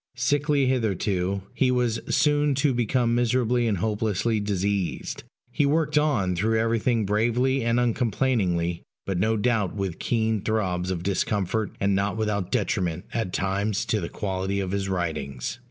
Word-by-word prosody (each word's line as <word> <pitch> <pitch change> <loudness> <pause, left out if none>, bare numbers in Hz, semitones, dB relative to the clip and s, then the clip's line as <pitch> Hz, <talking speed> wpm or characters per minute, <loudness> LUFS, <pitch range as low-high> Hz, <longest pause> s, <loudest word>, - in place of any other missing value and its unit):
Sickly 145 +2 +2
hitherto, 100 -6 0
he 125 +1 +2
was 125 -3 +1
soon 145 -1 +3
to 140 0 +2
become 120 0 +1
miserably 120 0 +2
and 105 -3 +1
hopelessly 110 +2 0
diseased: 100 -2 -2 0.3
he - - +1
worked 150 +1 +1
on 135 -12 +2
through 110 +5 +1
everything 115 0 +1
bravely 120 +6 +1
and 115 +1 +2
uncomplainingly, 110 -8 0 0.2
but 95 -3 -1
no 110 +3 +2
doubt 105 -4 +1
with 95 -4 -3
keen 110 -3 0
throbs 95 -5 -1
of 90 -2 -2
discomfort, 100 +2 -1
and 100 0 +2
not 100 +2 0
without 105 -4 -1
detriment 90 -1 -1
at 110 -5 -1
times 100 +3 -1
to 110 -3 0
the 85 - -4
quality 95 0 -2
of 95 -2 -2
his 100 -1 -1
writings. 80 - -3
110 Hz, 150 wpm, -25 LUFS, 95-120 Hz, 0.3 s, soon